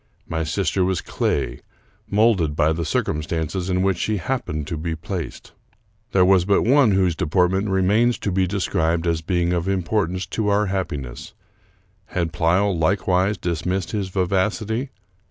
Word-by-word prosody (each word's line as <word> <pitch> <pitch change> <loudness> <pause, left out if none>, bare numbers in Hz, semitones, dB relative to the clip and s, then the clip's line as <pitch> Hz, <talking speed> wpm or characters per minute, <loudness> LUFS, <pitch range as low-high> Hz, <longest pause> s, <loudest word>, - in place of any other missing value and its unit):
My 80 0 -2
sister 90 +2 0
was 95 -1 0
clay, - - -2 0.5
molded 100 -8 +2
by 80 0 +3
the 85 +1 -3
circumstances 80 +4 -2
in 90 0 +1
which 95 -3 +1
she 110 -1 0
happened 90 - -3
to 80 - -4
be 80 +1 -3
placed. 85 +1 -6 0.6
There 95 -2 +4
was 95 -1 +5
but 100 +2 +2
one 130 -3 +4
whose 95 -3 +2
de - - -2
portment 95 +4 +2
remains 105 +6 +2
to 100 - -3
be 95 0 +1
described 85 -3 0
as 85 -1 0
being 85 0 0
of 85 +1 -1
importance 95 -1 0
to 110 -2 0
our 105 +1 +3
happiness. 85 -10 -4 0.7
Had 85 -3 -2
Pleyel 90 +5 +2
likewise 95 +3 +1
dismissed 90 +2 -2
his 100 -3 -2
vivacity? 105 +6 -1
90 Hz, 155 wpm, -22 LUFS, 85-100 Hz, 0.7 s, was